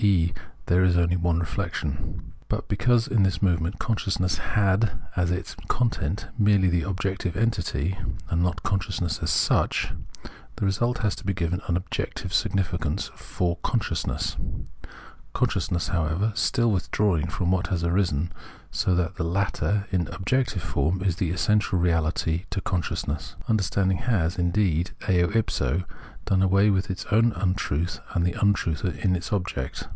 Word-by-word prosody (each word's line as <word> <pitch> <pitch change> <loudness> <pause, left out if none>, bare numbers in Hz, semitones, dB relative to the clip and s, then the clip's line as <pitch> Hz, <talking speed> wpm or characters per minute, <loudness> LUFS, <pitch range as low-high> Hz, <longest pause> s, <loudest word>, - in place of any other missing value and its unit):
e. 90 -5 +4 0.3
there 90 +1 +3
is 90 -1 +4
only 85 0 +3
one 85 -2 +1
reflection. 85 -5 -3 0.2
But - - -2
because 120 +3 +2
in 110 - +2
this 95 -1 +2
movement 90 -1 +1
consciousness 95 -4 0
had 105 -1 +1 0.2
as 85 -1 +1
its 90 0 -2
content 110 - 0
merely 100 -3 +4
the 85 -1 +2
objective 95 -1 -2
entity, 95 -6 0 0.4
and 85 - +2
not 90 +1 0
conscious 100 -3 -1
ness 85 -3 -1
as - - -1
such, - - +2 0.7
the - - -2
result 120 +6 +1
has 105 -3 +1
to - - -10
be 95 -1 -1
given 90 +2 -1
an 85 - +2
objective 90 0 -4
significance 95 -6 0
for 85 -1 -2
consciousness; 105 - -1 1.0
consciousness, 85 +3 0
however, 85 +3 0
still 115 +1 +2
withdrawing 90 -3 +1
from 90 0 -1
what 95 -1 +1
has 90 -3 -1
arisen, 85 -3 +1 0.4
so 90 - +1
that 90 +1 -1
the 90 - -1
latter 100 +2 0
in 90 -4 +1
objective 110 - -1
form 90 +3 0
is 90 -4 +1
the 90 - 0
essential 100 +3 +2
reahty 85 0 +1
to 100 - -2
consciousness. 80 -4 -2
Understanding 95 -3 +2
has, 90 -8 0
indeed, 90 -1 +2 0.2
eo 90 -2 +3
if 110 +2 +1
so, 80 +9 0 0.4
done 95 -1 +2
away 100 +2 +4
with 95 0 0
its 95 - -4
own 115 +2 +5
untruth 90 -4 -1 0.2
and 85 - +2
the 90 - +1
untruth 100 -6 +2 0.2
in 90 -1 +4
its 90 +1 -5
object. 90 -10 -2
90 Hz, 150 wpm, -26 LUFS, 85-100 Hz, 1.0 s, own